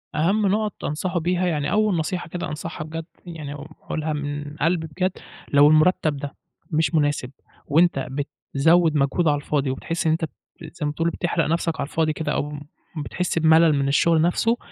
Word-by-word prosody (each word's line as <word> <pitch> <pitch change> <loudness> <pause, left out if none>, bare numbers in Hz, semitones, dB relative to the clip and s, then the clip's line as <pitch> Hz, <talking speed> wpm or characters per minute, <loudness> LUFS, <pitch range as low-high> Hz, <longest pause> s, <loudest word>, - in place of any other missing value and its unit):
أهم 195 +6 +2
نقط 210 +1 -1
أنصحه 175 +4 -1
بيها، 180 +2 0
يعني 150 -4 -1
أول 215 -3 +2
نصيحة 170 +2 -2
كده 175 - -4
أنصحها 155 0 -5
بجد، 160 +1 -6 0.2
يعني 155 -4 -7
أقولها 155 +1 -5
من 145 0 -4
قلبي 165 0 +1
بجد، 185 +4 -1 0.4
لو 145 +1 +7
المرتّب 155 -1 +3
ده 140 0 -6 0.4
مش 160 +2 +1
مناسب، 145 -4 +1 0.3
وأنت 155 -3 +2
بتزوّد 155 +3 +1
مجهود 145 +4 +2
على 145 - +4
الفاضي 145 -1 -1
وبتحس 165 +6 -3
إن - - +4
أنت 160 0 0
ب - - -7 0.3
زي 160 -1 -6
ما 145 - 0
تقول 165 +2 0
بتحرق 170 -1 -1
نفْسك 165 0 -1
على 140 - -1
الفاضي 160 -2 +1
كده، 150 -1 -3
أو 145 +1 -2 0.4
بتحس 165 +3 -2
بملل 160 0 +5
من 140 0 0
الشغل 160 +3 +3
نفْسه، 225 +8 +2
160 Hz, 175 wpm, -23 LUFS, 145-175 Hz, 0.4 s, لو